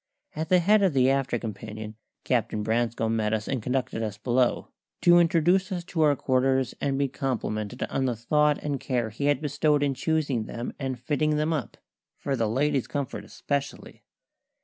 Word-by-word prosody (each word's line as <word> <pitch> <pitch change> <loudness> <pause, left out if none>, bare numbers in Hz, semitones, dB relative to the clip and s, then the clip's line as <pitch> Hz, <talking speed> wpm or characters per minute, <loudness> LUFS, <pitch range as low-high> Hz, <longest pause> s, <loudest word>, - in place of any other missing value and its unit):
At 160 +3 -3
the 185 - +6
head 205 +4 +4
of 190 -5 +3
the 130 -1 +4
after 135 -1 0
companion 110 0 -7 0.3
Captain 115 -4 0
Branscome 115 0 0
met 110 -1 +1
us 105 -1 -4
and 130 -4 -2
conducted 125 -1 -2
us 105 -2 -3
below, 120 +3 +1 0.3
to 175 0 +6
introduce 175 +3 +3
us 175 -2 -3
to 170 -2 -3
our 150 -2 +4
quarters 130 0 +1
and 135 -1 0
be 140 0 +1
complimented 125 -4 -3
on 135 - -1
the 125 -2 0
thought 150 +6 +2
and 145 -2 -2
care 120 -4 -1
he 130 +7 -4
had 145 -1 +2
bestowed 150 0 +1
in 140 -1 +1
choosing 140 -5 -1
them 120 +2 -5
and 135 -2 -3
fitting 150 +4 0
them 155 +2 +1
up 145 -8 -4 0.4
for 140 - -2
the 115 -3 0
ladies' 135 +2 +1
comfort 135 -7 -4
especially. 140 +6 -4
135 Hz, 180 wpm, -26 LUFS, 115-150 Hz, 0.4 s, the